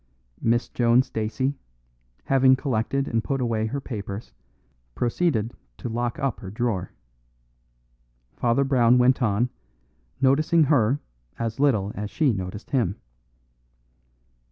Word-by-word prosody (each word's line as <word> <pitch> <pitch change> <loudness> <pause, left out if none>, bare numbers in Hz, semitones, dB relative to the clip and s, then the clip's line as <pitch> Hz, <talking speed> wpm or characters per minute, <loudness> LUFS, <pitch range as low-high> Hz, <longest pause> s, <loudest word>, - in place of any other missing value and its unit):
Miss 120 +1 +1
Joan 120 +1 +3
Stacey, 130 +5 -2 0.6
having 130 -1 +5
collected 135 +1 -1
and 115 -1 0
put 135 -1 -1
away 115 -3 0
her 140 +5 -3
papers, 100 - -6 0.6
proceeded 120 -3 0 0.2
to - - -5
lock 120 +1 -2
up 135 -3 -2
her 95 - -8
drawer. 110 -3 -2 1.4
Father 120 +3 +2
Brown 125 -3 +4
went 125 +2 +4
on, 120 +2 +1 0.7
noticing 155 +5 +4
her 135 -2 +3 0.4
as 115 0 -3
little 110 -9 +2
as 105 0 -5
she 140 -2 +2
noticed 95 +1 -6
him. 115 -8 +1
120 Hz, 115 wpm, -25 LUFS, 110-135 Hz, 1.4 s, having